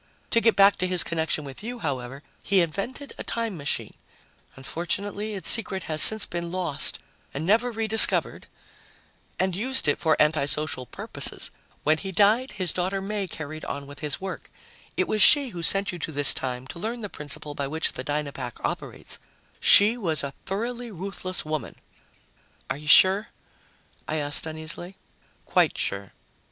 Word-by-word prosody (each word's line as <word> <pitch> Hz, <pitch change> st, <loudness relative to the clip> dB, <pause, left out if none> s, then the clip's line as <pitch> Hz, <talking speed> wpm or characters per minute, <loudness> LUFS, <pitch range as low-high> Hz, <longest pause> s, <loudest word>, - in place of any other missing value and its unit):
To 230 Hz, -, +3 dB
get 230 Hz, -1 st, +3 dB
back 200 Hz, 0 st, +5 dB
to 185 Hz, -, -1 dB
his 180 Hz, -1 st, +3 dB
connection 160 Hz, -2 st, -2 dB
with 135 Hz, +3 st, -10 dB
you, 240 Hz, +3 st, -6 dB
however, 135 Hz, -, -5 dB, 0.2 s
he 195 Hz, -2 st, +3 dB
invented 200 Hz, -, -4 dB
a -, -, -4 dB
time 230 Hz, -4 st, -3 dB
machine 145 Hz, -3 st, -3 dB, 0.6 s
unfortunately, 200 Hz, +9 st, -4 dB
its 190 Hz, -4 st, -3 dB
secret 190 Hz, -5 st, +3 dB
has 155 Hz, -1 st, +1 dB
since 220 Hz, -1 st, +5 dB
been 170 Hz, -1 st, -5 dB
lost 175 Hz, -6 st, 0 dB, 0.4 s
and 145 Hz, +3 st, -3 dB
never 225 Hz, +6 st, +2 dB
re 225 Hz, -1 st, -3 dB
discovered 220 Hz, 0 st, +4 dB, 0.9 s
and 185 Hz, -1 st, 0 dB
used 255 Hz, -2 st, +2 dB
it 145 Hz, -, +1 dB
for 160 Hz, -2 st, +1 dB
anti 150 Hz, -1 st, +2 dB
social 145 Hz, -3 st, -2 dB
purposes. -, -, 0 dB, 0.3 s
When 155 Hz, +1 st, +2 dB
he 195 Hz, -, -6 dB
died, 215 Hz, +7 st, +2 dB
his 185 Hz, -4 st, -2 dB
daughter 185 Hz, +2 st, -2 dB
May 200 Hz, 0 st, -3 dB
carried 155 Hz, -2 st, -7 dB
on 140 Hz, 0 st, -6 dB
his 145 Hz, 0 st, -5 dB
work. 190 Hz, 0 st, -7 dB, 0.5 s
It -, -, +1 dB
was 215 Hz, -, 0 dB
she 285 Hz, -3 st, +6 dB
who 175 Hz, -6 st, -7 dB
sent 195 Hz, +4 st, +1 dB
you 175 Hz, -, -8 dB
to 160 Hz, -, -4 dB
this 145 Hz, -1 st, +8 dB
time 125 Hz, -1 st, -4 dB
to 170 Hz, -, -8 dB
learn 230 Hz, +5 st, -4 dB
the 210 Hz, -, -4 dB
principle 150 Hz, -3 st, -4 dB
by 140 Hz, -1 st, -4 dB
which 160 Hz, +3 st, -1 dB
the 130 Hz, -, -6 dB
Dynapack 140 Hz, -4 st, -4 dB
operates. -, -, -4 dB, 0.4 s
She 215 Hz, +4 st, +6 dB
was 165 Hz, -10 st, -1 dB
a 140 Hz, -1 st, -5 dB
thoroughly 235 Hz, +4 st, -4 dB
ruthless 185 Hz, -2 st, -5 dB
woman." 155 Hz, 0 st, -4 dB, 1.0 s
"Are -, -, -2 dB
you 150 Hz, +1 st, -11 dB
sure?" 190 Hz, +7 st, +6 dB, 0.8 s
I 155 Hz, -, -2 dB
asked 145 Hz, +1 st, 0 dB
uneasily. 160 Hz, +4 st, -4 dB, 0.5 s
"Quite -, -, +2 dB
sure." 100 Hz, -1 st, -4 dB
175 Hz, 165 wpm, -25 LUFS, 150-205 Hz, 1.0 s, this